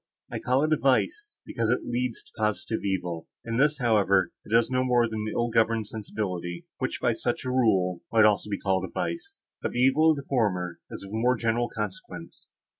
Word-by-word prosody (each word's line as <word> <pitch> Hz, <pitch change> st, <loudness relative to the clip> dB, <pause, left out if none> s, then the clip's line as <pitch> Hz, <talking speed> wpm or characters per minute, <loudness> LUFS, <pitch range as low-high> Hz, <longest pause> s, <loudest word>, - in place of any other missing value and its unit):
I -, -, -3 dB
call 130 Hz, +3 st, +2 dB
it 155 Hz, 0 st, +2 dB
a -, -, +3 dB
vice, 350 Hz, -, 0 dB
because 115 Hz, -1 st, -1 dB
it 125 Hz, -, +1 dB
leads 125 Hz, 0 st, -2 dB
to -, -, -23 dB
positive 110 Hz, +1 st, -1 dB
evil; 90 Hz, -4 st, -2 dB, 0.2 s
in 115 Hz, 0 st, -2 dB
this, 150 Hz, +2 st, +3 dB
however, 100 Hz, -7 st, +3 dB
it -, -, -15 dB
does 115 Hz, +2 st, +3 dB
no 130 Hz, 0 st, +2 dB
more 120 Hz, -2 st, +3 dB
than 110 Hz, -1 st, -4 dB
an -, -, -3 dB
ill 120 Hz, 0 st, +1 dB
governed 115 Hz, -1 st, +2 dB
sensibility, 95 Hz, -5 st, -4 dB
which, -, -, -2 dB
by -, -, +2 dB
such -, -, -2 dB
a -, -, -1 dB
rule, 95 Hz, -8 st, +2 dB
might 110 Hz, -1 st, +6 dB
also 105 Hz, 0 st, +2 dB
be 100 Hz, -, -1 dB
called 95 Hz, -1 st, 0 dB
a 95 Hz, -, -4 dB
vice; 395 Hz, +4 st, -4 dB, 0.2 s
but -, -, -3 dB
the 120 Hz, -, -2 dB
evil 135 Hz, +5 st, +5 dB
of 155 Hz, -, +3 dB
the 140 Hz, -, -6 dB
former 90 Hz, -9 st, 0 dB
is -, -, -8 dB
of 100 Hz, -, -10 dB
more 120 Hz, +3 st, +2 dB
general 115 Hz, +1 st, 0 dB
consequence. 105 Hz, -4 st, -7 dB
115 Hz, 210 wpm, -27 LUFS, 100-125 Hz, 0.2 s, might